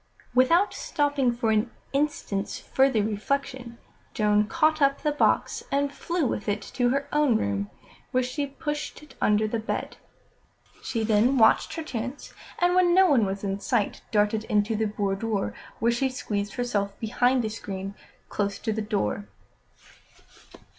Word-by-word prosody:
Without 330 +11 +4
stopping 285 -4 0
for 235 -2 0
an 215 +2 +2 0.2
instant's 275 -9 -1
further 265 -5 +2
reflection, 245 +3 -3 0.4
Joan 210 -1 +3
caught 310 +6 +2
up 275 0 +2
the 300 - +2
box 295 - +1
and 280 0 +1
flew 340 +1 -1
with 215 -3 -2
it 205 0 -1
to 245 -1 +2
her 280 +2 0
own 295 -6 +4
room, 100 0 -2 0.4
where 255 0 +1
she 280 +3 -2
pushed 295 +2 -5
it 300 - -15
under 210 +1 +3
the 225 +1 -2
bed. 220 - -4 0.8
She 230 -3 -2
then 225 +5 +3
watched 220 -2 +4
her 325 - -4
chance, 255 -1 -5 0.2
and 355 0 +3
when 360 -1 +4
no 380 0 +7
one 240 - +4
was 195 +1 -4
in 195 0 -2
sight, 220 0 -1
darted 210 0 +2
into 210 +1 +1
the 220 +1 0
boudoir, 205 0 -1 0.2
where 235 +1 +2
she 265 +3 +1
squeezed 205 -6 -3
herself 205 -5 -2
behind 245 +2 +2
a - - -1
screen 195 -2 -6 0.3
close 200 -1 -2
to 220 - -2
the 220 - -2
door. 200 - -2
235 Hz, 155 wpm, -26 LUFS, 210-275 Hz, 0.8 s, no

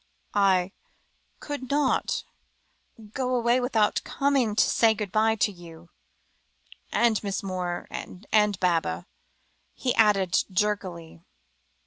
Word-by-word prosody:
"I 195 -2 +3 0.7
could 285 -4 -6
not 285 -1 +1 0.9
go 255 -1 -1
away 240 +1 +2
without 225 -4 +1
coming 275 -6 0
to 215 - +5
say 225 -1 +3
good 205 -2 -5
bye 220 +1 +2
to 210 -1 +1
you 170 -2 -14 1.0
and 230 -3 +2
Miss 200 -1 -3
Moore 180 -2 -4
and 210 +1 -1
Baba," 175 -3 0 0.7
he 250 -2 -1
added 195 -5 +3
jerkily. 185 -4 -2
210 Hz, 105 wpm, -26 LUFS, 185-235 Hz, 1.0 s, to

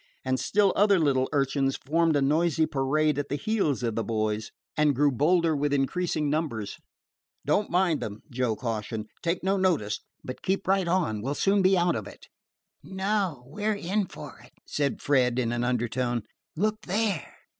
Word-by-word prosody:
And 130 0 0
still 200 - +2
other 205 -1 +5
little 135 -5 +2
urchins 135 -1 +1
formed 165 +2 +1
a 140 - +2
noisy 160 +2 +2
parade 150 +1 +1
at 145 - -3
the 145 - -1
heels 150 - 0
of 115 -2 0
the 115 - -1
boys, 110 0 -1 0.3
and 150 -2 +3
grew 145 +2 +3
bolder 160 +4 +2
with 145 0 0
increasing 150 +2 0
numbers. 145 -9 -2 0.7
"Don't 175 +9 +1
mind 175 -3 +2
them," 105 0 -6
Joe 120 -2 0
cautioned. 110 -2 -4
"Take 170 +1 -1
no 195 +1 +2
notice, 160 - +1 0.2
but 130 - -7
keep 190 0 -1
right 190 -1 +2
on. 170 - 0
We 130 - -3
'll 145 - -1
soon 195 +4 +2
be 190 0 +4
out 175 0 +2
of 105 -2 -4
it." - - -13 0.6
"No; 190 -4 -2
we 180 +10 -8
're 215 0 +2
in 200 +1 -1
for - - -10
it," - - -19
said 140 -2 -2
Fred, 125 -4 +2
in 120 -2 0
an 120 0 -1
undertone. 120 -1 -1 0.3
"Look 215 +5 0
there!" 200 -3 -1
145 Hz, 180 wpm, -27 LUFS, 125-180 Hz, 0.7 s, other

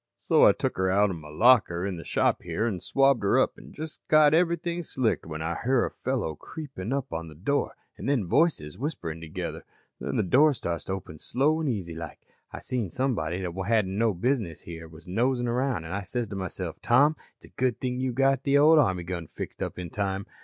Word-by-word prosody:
So - - +4
I - - +8
took - - -3
'er 95 0 +2
out 100 +1 +3
of 90 - -5
my 75 -1 -11
locker 95 -1 +4
in 95 -3 -3
the 85 - -7
shop - - +1
here 115 - -2
an' 105 -6 -1
swabbed 135 +5 +3
her 100 - +3
up - - +2
an' - - -14
just 155 0 -8
got 155 -1 +6
everything 170 +1 +1
slicked 130 - -1
when 80 0 -5
I 85 +1 -2
hear 130 0 +3
a - - -4
fellow 125 -11 -2
creeping 130 - -7
up 135 -1 -1
to 80 0 -4
the 80 - -12
door 140 - -1 0.2
an' - - -5
then 135 -8 +1
voices 110 - +1
whisperin' 85 - -4
together. 80 -1 -5 0.4
"Then - - -3
the - - +2
door 140 - +4
starts 85 - -4
to 95 - -2
open 85 -5 -7
slow 150 +5 +1
an' 155 - -1
easy 95 -9 -2
like. 80 0 -8 0.3
I - - -7
seen 120 -7 -2
somebody 95 -8 -1
what 90 +2 -4
hadn't 105 -5 +2
no 110 -1 +2
business 110 - -1
here 80 -1 -9
was 80 +1 -14
nosin' 120 +6 +1
around 125 -6 0
an' 80 - -7
I 100 - -2
says 115 +4 -3
to 100 - -6
myself: 95 -3 -5
'Tom, 140 +6 +4 0.2
it's - - -18
a - - -16
good 125 -2 -1
thing 125 -1 -2
you 130 0 0
got 135 +1 +2
the 140 0 +3
ol' 155 +2 +7
army 95 -10 +2
gun 85 -2 -5
fixed - - -8
up - - -3
in 90 -2 -6
time.' 100 -1 -2
110 Hz, 225 wpm, -27 LUFS, 85-135 Hz, 0.4 s, I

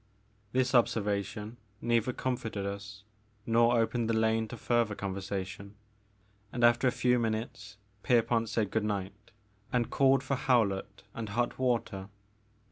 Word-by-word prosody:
This 130 +1 +1
observation 110 -1 0 0.2
neither 120 +1 +1
comforted 115 -6 -3
us 100 0 -6 0.4
nor 115 +1 +4
opened 115 0 0
the 115 - +2
lane 110 0 +2
to 120 - -8
further 115 -3 +1
conversation, 100 0 -5 0.8
and 120 - -2
after 120 +2 +5
a - - +4
few 125 0 +2
minutes 110 -3 -3 0.2
Pierpont 115 -1 +2
said 105 -4 -1
good 110 - 0
night 105 0 -4 0.4
and 120 -2 0
called 135 -1 +4
for 140 +1 -1
Howlett 115 -8 0
and 115 -2 -5
hot 120 +5 -1
water. 115 -6 -1
115 Hz, 130 wpm, -30 LUFS, 105-120 Hz, 0.8 s, after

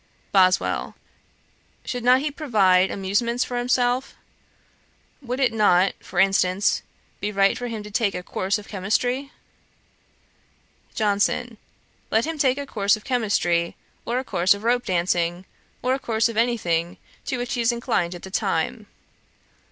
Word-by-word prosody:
BOSWELL. 185 -2 +2 0.9
'Should 245 -1 -4
not 250 +2 +5
he 295 +1 -2
provide 195 - +3
amusements 235 +6 0
for 245 -1 -3
himself? 245 +1 0 1.1
Would 250 -1 -4
it 255 -4 +2
not, 195 -4 +3
for 185 - -11
instance, 195 0 +2 0.4
be 205 - -2
right 195 -1 +3
for 245 - -4
him 225 -3 -5
to 210 - -10
take 205 -2 0
a 180 - -4
course 190 +3 -1
of 210 - -11
chymistry?' 245 +8 -1 1.7
JOHNSON. 215 +3 0 0.5
'Let 220 - +2
him 320 -1 -4
take 265 -2 +3
a 285 - -4
course 205 -4 +1
of 215 - -15
chymistry, 200 -9 0 0.3
or 240 - -2
a 260 - -1
course 185 -5 +2
of 200 - -10
rope 245 +1 +1
dancing, 175 0 0 0.4
or 255 +1 +2
a 270 - -1
course 225 -3 +1
of 230 - -6
any 235 +2 +2
thing 170 -3 -1 0.3
to 260 - -1
which 245 0 -3
he 245 - -1
is 230 +1 +3
inclined 230 -7 -1
at 175 - -11
the 190 - -9
time. - - -1
220 Hz, 155 wpm, -23 LUFS, 190-245 Hz, 1.7 s, not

